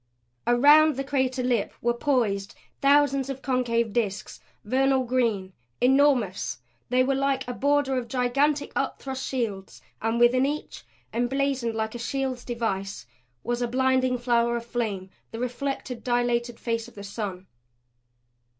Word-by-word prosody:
Around 295 +5 +6
the 275 - -2
crater 260 -2 0
lip 245 -4 0
were 240 0 +1
poised 230 -7 0 0.3
thousands 275 -1 +3
of 270 0 -6
concave 235 -4 0
disks, 210 -4 -2 0.3
vernal 265 +3 +2
green, 230 -7 0 0.3
enormous. 255 - +2 0.3
They 255 +1 +3
were 270 +1 +1
like 270 -1 0
a 250 - -3
border 280 0 +1
of 240 - -7
gigantic, 275 +4 +1
upthrust 265 -1 -3
shields; 215 -7 -3 0.2
and 225 +1 0
within 245 +2 +5
each, 300 +1 -5 0.3
emblazoned 245 0 0
like 220 0 -2
a 240 - -6
shield's 260 0 -2
device, 200 - -3 0.4
was 240 +1 -2
a 245 - +1
blinding 255 0 +2
flower 235 -1 +1
of 235 - -6
flame 210 -6 -3 0.2
the 225 - -7
reflected, 250 0 -4
dilated 240 -1 0
face 230 -1 -2
of 240 - -16
the 200 - -8
sun. 195 -2 -5
245 Hz, 140 wpm, -26 LUFS, 230-270 Hz, 0.4 s, Around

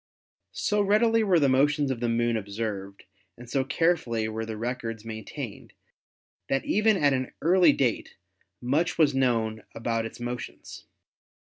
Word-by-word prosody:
So 210 0 +1
readily 225 +3 +3
were 185 -5 +3
the 145 - +3
motions 140 +2 +2
of 125 - -3
the 120 0 -1
Moon 120 0 +1
observed 100 -2 -5 0.3
and 120 +1 -12
so 135 +2 0
carefully 130 -7 0
were 110 0 -4
the 110 -1 -5
records 115 -1 -4
maintained 110 -2 -7 0.8
that 135 - 0
even 210 +1 +3
at 145 -5 +3
an 130 -1 -2
early 175 0 +5
date 130 -5 -1 0.4
much 145 +8 0
was 150 -4 +4
known 115 -4 0
about 115 0 -1
its 115 +2 -13
motions. 120 0 -7
125 Hz, 145 wpm, -27 LUFS, 115-150 Hz, 0.8 s, early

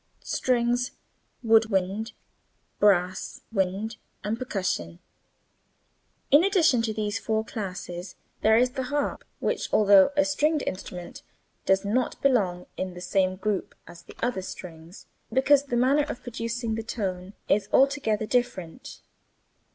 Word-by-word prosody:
strings, 245 0 0 0.5
wood 225 -1 +5
wind, 195 +3 -1 0.7
brass 185 -2 +2
(wind) 200 +2 -1 0.3
and 215 +3 -2
percussion. 185 - -2 1.3
In 290 +4 +7
addition 345 - +4
to 225 -1 -1
these 210 -1 -2
four 220 0 -1
classes, 185 -4 -6 0.3
there 220 +1 +5
is 250 +1 +3
the 265 -1 -3
harp, 290 +2 -2
which - - -2
although 200 -2 +6
a 290 - +5
stringed 295 +1 +1
instrument, 180 -1 -6 0.5
does 190 +1 +3
not 240 +5 0
belong 195 -10 +2
in 185 -1 -4
the - - -8
same 185 +1 +1
group 195 +1 -2
as 175 - -13
the - - -14
other 240 -5 0
strings 170 0 -10 0.3
because 275 +2 +4
the 245 -3 -1
manner 275 +4 +3
of - - -6
producing 230 -1 -3
the 225 - -2
tone 195 -4 -4
is 205 0 +1
altogether 265 -6 +2
different. 240 -8 -3
220 Hz, 130 wpm, -26 LUFS, 190-250 Hz, 1.3 s, In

